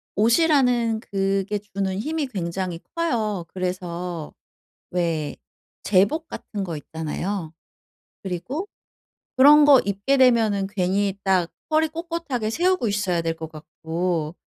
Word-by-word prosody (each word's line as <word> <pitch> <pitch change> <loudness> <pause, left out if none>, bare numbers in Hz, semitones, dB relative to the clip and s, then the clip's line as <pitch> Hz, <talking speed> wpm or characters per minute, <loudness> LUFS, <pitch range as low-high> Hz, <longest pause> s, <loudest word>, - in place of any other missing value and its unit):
옷이라는 240 - +3
그게 195 0 -1
주는 195 -2 -3
힘이 305 +5 -2
굉장히 185 -5 -3 0.2
커요. 220 - -1
그래서 180 -3 -4 0.6
왜 165 -4 -1 0.5
제복 205 - +2
같은 205 -9 -6
거 170 -4 -4
있잖아요. 160 +3 -4 0.7
그리고 200 - -4 0.7
그런 295 +3 +8
거 285 -3 +8
입게 200 +8 0
되면은 225 -6 +4
괜히 195 0 0
딱 185 -3 +2 0.2
허리 315 +1 +3
꼿꼿하게 325 -8 -3
세우고 355 +1 +1
있어야 200 -4 0
될 165 0 -2
것 160 -1 -7
같고 160 +1 -3
200 Hz, 240 characters per minute, -23 LUFS, 175-250 Hz, 0.7 s, 그런